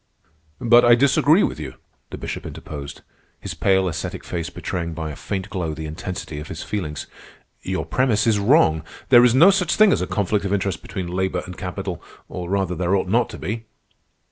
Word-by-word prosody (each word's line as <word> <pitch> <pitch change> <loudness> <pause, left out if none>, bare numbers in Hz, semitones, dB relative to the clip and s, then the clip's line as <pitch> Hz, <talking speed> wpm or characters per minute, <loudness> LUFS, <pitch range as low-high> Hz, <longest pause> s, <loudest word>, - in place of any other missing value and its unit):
'" 80 -1 -39
"But 120 +1 +5
I 120 0 +7
disagree 140 - +4
with - - -2
you," 75 - -7 0.3
the - - -7
Bishop - - -5
interposed, 70 -1 -8 0.4
his - - -6
pale, 95 -1 +2
ascetic 85 -2 -4
face 85 -1 -4
betraying 85 -2 -4
by 80 -1 -4
a - - -8
faint 95 +3 -5
glow 85 -6 -3
the 80 - -6
intensity 80 -1 -6
of 75 - -8
his - - -6
feelings. 80 -8 -4 0.6
"Your 95 0 -3
premise 120 -5 +1
is 110 -3 +3
wrong. 100 - +4 0.3
There 120 -2 +8
is 125 0 +4
no 170 +9 +8
such 185 -4 +1
thing 215 -2 +6
as - - 0
a - - -2
conflict 100 0 0
of 100 0 -1
interest 95 -4 -1
between 95 - -5
labor 90 0 -2
and 90 - -8
capital—or, 90 +1 -7
rather, 95 -2 0
there 90 +2 0
ought 95 -1 -1
not 115 +3 +2
to - - -8
be." 110 +2 -4
95 Hz, 195 wpm, -22 LUFS, 85-115 Hz, 0.6 s, There